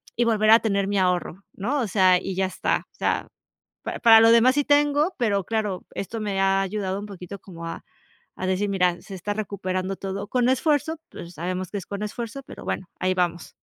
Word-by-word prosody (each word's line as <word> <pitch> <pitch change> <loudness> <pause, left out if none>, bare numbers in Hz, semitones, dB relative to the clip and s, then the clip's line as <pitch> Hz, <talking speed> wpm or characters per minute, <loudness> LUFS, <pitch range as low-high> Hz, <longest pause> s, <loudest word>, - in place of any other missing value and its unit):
y 240 - +2
volver 215 -2 +2
a 225 - +9
tener 200 -3 0
mi 200 0 0
ahorro, 180 0 0
¿no? 250 +9 -1
O 235 - -1
sea, 185 -2 +4
y 190 0 -4
ya 190 +1 +1
está. 185 - -1
O - - -34
sea, - - -1 0.6
para - - -4
para 225 -2 +8
lo 225 0 +6
demás 235 +3 +5
sí 290 - +2
tengo, 290 +4 +3
pero 205 -5 +1
claro, 210 -3 -2
esto 220 +4 -4
me 205 -2 -2
ha 195 0 +3
ayudado 195 0 -2
un 205 - -6
poquito 195 0 -9
como 170 -3 -10
a, 165 - -6 0.5
a 185 - -4
decir: 190 +2 0
"Mira, 180 -3 +1
se 195 - -9
está 205 +3 -3
recuperando 195 -2 -3
todo 195 +1 -5
con 245 +2 +1
esfuerzo, 300 +4 +1
pues 170 +1 -10
sabemos 185 +2 -3
que 205 - -3
es 190 - -6
con 200 +1 -4
esfuerzo, 235 +5 -5
pero - - -11
bueno, 185 - -3
ahí 185 0 +1
vamos. 175 -2 -1
200 Hz, 215 wpm, -24 LUFS, 185-225 Hz, 0.6 s, a